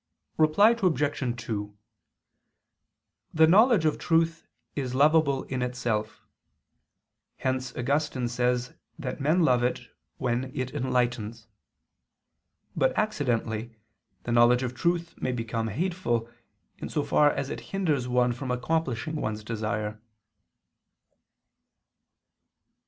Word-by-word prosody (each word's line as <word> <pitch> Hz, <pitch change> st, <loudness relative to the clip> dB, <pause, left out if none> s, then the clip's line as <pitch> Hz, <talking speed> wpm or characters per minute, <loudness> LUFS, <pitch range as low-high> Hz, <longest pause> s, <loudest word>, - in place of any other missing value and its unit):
Reply 155 Hz, +8 st, +5 dB
Obj. 145 Hz, -, 0 dB
2: 105 Hz, -2 st, -4 dB, 1.6 s
The 160 Hz, 0 st, +7 dB
knowledge 205 Hz, +1 st, +5 dB
of 155 Hz, -, +1 dB
truth 165 Hz, 0 st, +1 dB, 0.3 s
is 130 Hz, -3 st, -3 dB
lovable 145 Hz, -1 st, +3 dB
in 130 Hz, -1 st, -4 dB
itself: 120 Hz, -4 st, -2 dB, 1.1 s
hence 130 Hz, -1 st, -2 dB
Augustine 135 Hz, 0 st, 0 dB
says 125 Hz, +1 st, 0 dB, 0.2 s
that 140 Hz, -2 st, -5 dB
men 160 Hz, +6 st, +3 dB
love 125 Hz, -5 st, +3 dB
it 125 Hz, -, -2 dB, 0.3 s
when 125 Hz, 0 st, -1 dB
it 130 Hz, 0 st, -3 dB
enlightens. 120 Hz, -3 st, -1 dB, 1.3 s
But 130 Hz, -, +1 dB
accidentally, 120 Hz, -, -1 dB, 0.5 s
the 120 Hz, -, -3 dB
knowledge 120 Hz, +2 st, +5 dB
of 125 Hz, -1 st, -3 dB
truth 170 Hz, +5 st, -1 dB
may 130 Hz, -, 0 dB
become 115 Hz, -1 st, -2 dB
hateful, 120 Hz, -, -1 dB, 0.5 s
in -, -, -5 dB
so 150 Hz, -, -1 dB
far 150 Hz, 0 st, +4 dB
as 140 Hz, -, -3 dB
it -, -, -4 dB
hinders 155 Hz, -10 st, 0 dB
one 125 Hz, 0 st, +2 dB
from 130 Hz, +2 st, -6 dB
accomplishing 155 Hz, +2 st, -1 dB
one's 110 Hz, -5 st, -3 dB
desire. 105 Hz, -1 st, -3 dB
125 Hz, 110 wpm, -27 LUFS, 120-155 Hz, 1.6 s, The